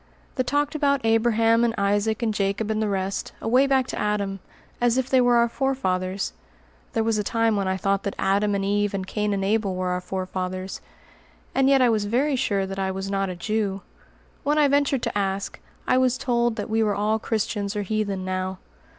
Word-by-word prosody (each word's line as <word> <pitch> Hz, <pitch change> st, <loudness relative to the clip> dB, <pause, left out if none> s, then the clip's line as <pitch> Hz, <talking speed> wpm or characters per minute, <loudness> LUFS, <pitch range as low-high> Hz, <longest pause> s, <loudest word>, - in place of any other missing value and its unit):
The 255 Hz, -, 0 dB
talked 290 Hz, +3 st, 0 dB
about 280 Hz, -4 st, +1 dB
Abraham 225 Hz, 0 st, +3 dB
and 235 Hz, -1 st, +1 dB
Isaac 205 Hz, +3 st, +1 dB
and 220 Hz, -2 st, +1 dB
Jacob 205 Hz, +2 st, -1 dB
and 215 Hz, 0 st, 0 dB
the 215 Hz, -, 0 dB
rest, 195 Hz, 0 st, -2 dB
away 255 Hz, +5 st, +3 dB
back 265 Hz, -2 st, +3 dB
to -, -, -4 dB
Adam, 200 Hz, -2 st, -1 dB, 0.4 s
as 240 Hz, 0 st, +3 dB
if 260 Hz, -1 st, 0 dB
they 260 Hz, -1 st, +5 dB
were 245 Hz, -1 st, +4 dB
our 235 Hz, 0 st, +4 dB
forefathers 195 Hz, -8 st, -1 dB, 0.6 s
(there 225 Hz, -, +1 dB
was 225 Hz, -1 st, +1 dB
a -, -, 0 dB
time 225 Hz, +1 st, +1 dB
when 200 Hz, -1 st, 0 dB
I 190 Hz, 0 st, 0 dB
thought 195 Hz, 0 st, 0 dB
that 200 Hz, -, -4 dB
Adam 200 Hz, +1 st, +1 dB
and 195 Hz, 0 st, -1 dB
Eve 205 Hz, 0 st, +1 dB
and 190 Hz, -1 st, -3 dB
Cain 210 Hz, +2 st, -1 dB
and 195 Hz, -1 st, -1 dB
Abel 205 Hz, -2 st, +1 dB
were 185 Hz, 0 st, -1 dB
our 180 Hz, 0 st, -1 dB
four 185 Hz, 0 st, -4 dB
fathers); 185 Hz, 0 st, -4 dB, 0.7 s
and 270 Hz, 0 st, +3 dB
yet 270 Hz, -2 st, +5 dB
I 245 Hz, -, +5 dB
was 215 Hz, -2 st, +1 dB
very 265 Hz, +7 st, +1 dB
sure 200 Hz, -6 st, 0 dB
that 195 Hz, 0 st, -5 dB
I 190 Hz, 0 st, 0 dB
was 190 Hz, +1 st, -4 dB
not 195 Hz, -1 st, 0 dB
a 180 Hz, -, -4 dB
Jew. 200 Hz, +1 st, -2 dB, 0.6 s
When 295 Hz, +1 st, +1 dB
I 300 Hz, -1 st, +5 dB
ventured 280 Hz, -2 st, +2 dB
to -, -, -2 dB
ask, 195 Hz, -1 st, -2 dB, 0.3 s
I 255 Hz, -, +4 dB
was 255 Hz, -1 st, +2 dB
told 240 Hz, -3 st, +1 dB
that -, -, -4 dB
we 225 Hz, 0 st, +1 dB
were 210 Hz, -2 st, +1 dB
all 215 Hz, +2 st, +1 dB
Christians 210 Hz, -2 st, -2 dB
or 205 Hz, -, -1 dB
heathen 200 Hz, -2 st, -2 dB
now. 185 Hz, 0 st, -2 dB
210 Hz, 215 wpm, -24 LUFS, 195-235 Hz, 0.7 s, they